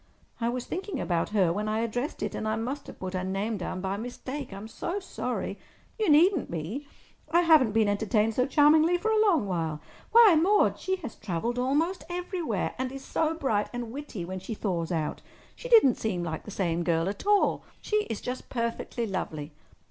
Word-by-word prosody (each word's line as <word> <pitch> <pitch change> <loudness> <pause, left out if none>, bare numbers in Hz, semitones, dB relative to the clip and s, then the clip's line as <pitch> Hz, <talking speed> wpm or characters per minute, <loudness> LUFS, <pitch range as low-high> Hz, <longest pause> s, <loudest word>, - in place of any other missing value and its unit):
"I 230 0 0
was 245 0 -3
thinking 370 -4 -4
about 170 -2 0
her 190 -5 +2
when 210 +3 -2
I 215 +1 0
addressed 245 +5 -3
it, - - -2
and 220 - -3
I 215 - +1
must 260 +6 -4
have - - -10
put 185 0 -5
her 185 -1 -2
name 195 +4 -2
down 185 0 -4
by 195 +1 -2
mistake. 250 +4 -6
I'm 195 +2 -7
so 340 - -4
sorry—" 375 - -4 0.4
"You 430 -5 +2
needn't 335 +3 +5
be. 180 - -4 0.4
I 340 +2 +4
haven't 310 -9 +5
been 220 -1 +3
entertained 215 +2 +1
so 250 +3 +1
charmingly 310 +5 +5
for 440 +5 -1
a 435 -1 +4
long 345 - +3
while. 165 -5 -2 0.3
Why, 455 -5 +8
Maude, 410 +4 +3
she 375 - -1
has 245 - -5
travelled 220 +5 -3
almost 295 +7 0
everywhere—and 335 - -2
is 270 0 -8
so 320 0 0
bright 225 -10 0
and 240 -2 -5
witty 265 -9 -6
when 185 +1 -5
she 190 +4 -6
thaws 180 -5 -2
out. 160 -3 -2 0.3
She - - -8
didn't 440 - +6
seem 185 -6 -1
like 160 -2 -4
the - - -8
same 175 -4 -1
girl 165 0 +1
at 200 - -5
all. 415 -1 +3 0.2
She 425 - 0
is 225 - -5
just 250 +1 -5
perfectly 235 0 -2
lovely!" 160 -7 -4
230 Hz, 195 wpm, -28 LUFS, 195-310 Hz, 0.4 s, Why